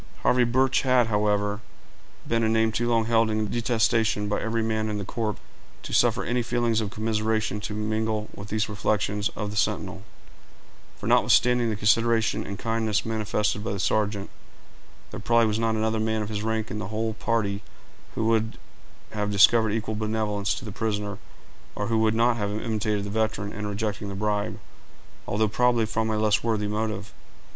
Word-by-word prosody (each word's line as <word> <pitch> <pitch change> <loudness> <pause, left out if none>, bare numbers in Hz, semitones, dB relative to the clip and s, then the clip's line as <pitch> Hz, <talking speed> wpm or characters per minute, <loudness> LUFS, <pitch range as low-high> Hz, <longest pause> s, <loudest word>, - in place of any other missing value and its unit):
Harvey 125 0 +4
Birch 130 +2 +2
had, 125 -2 +4
however, 105 0 +1 0.7
been 115 0 +1
a 110 - +2
name 110 0 +2
too 120 +2 -1
long 115 -1 +2
held 115 -1 +3
in 110 -1 -1
detestation 115 -3 +1
by 105 - -1
every 115 0 -1
man 110 -1 -1
in 105 - -2
the 100 - -4
corps, 110 0 -2 0.5
to - - -7
suffer - - +3
any 125 +1 0
feelings 120 -1 0
of 105 - -2
commiseration 110 -1 -1
to 105 0 -5
mingle 110 0 -1
with 100 0 -9
these 105 0 0
reflections 105 0 0
of 105 -1 -4
the - - -7
sentinel; - - -1 1.0
for, - - -9
notwithstanding 125 -1 +4
the 110 - -1
consideration 115 +2 +2
and 100 - -5
kindness 115 -2 -1
manifested 105 -2 -1
by - - -2
the 100 - -3
sergeant, 105 0 0 0.8
there - - -6
probably 115 -1 +3
was 110 0 0
not 115 -1 +1
another 110 0 0
man 110 0 0
of 105 - -6
his 105 -1 -3
rank 110 0 -2
in 105 - -4
the 105 - -4
whole 110 +2 -2
party 105 -3 -1 0.5
who 110 - -1
would 110 -1 +1 0.5
have 105 -1 -2
discovered 110 +2 +5
equal 110 +1 -2
benevolence 105 -1 -1
to 95 - -8
the 105 - -6
prisoner, 105 -1 -3 0.6
or 105 +1 -3
who 115 -1 +2
would 110 0 +2
not 120 +1 +3
have 105 -2 -1
imitated 105 -1 -1
the 100 - -5
veteran 110 -2 -1
in 105 0 -4
rejecting 105 0 -3
the 100 - -5
bribe, 105 0 -1 0.7
although 110 +2 +1
probably 120 +1 +2
from 110 +1 -1
a 110 - 0
less 105 -1 +2
worthy 110 -2 0
motive. 105 0 -3
110 Hz, 180 wpm, -26 LUFS, 105-115 Hz, 1.0 s, discovered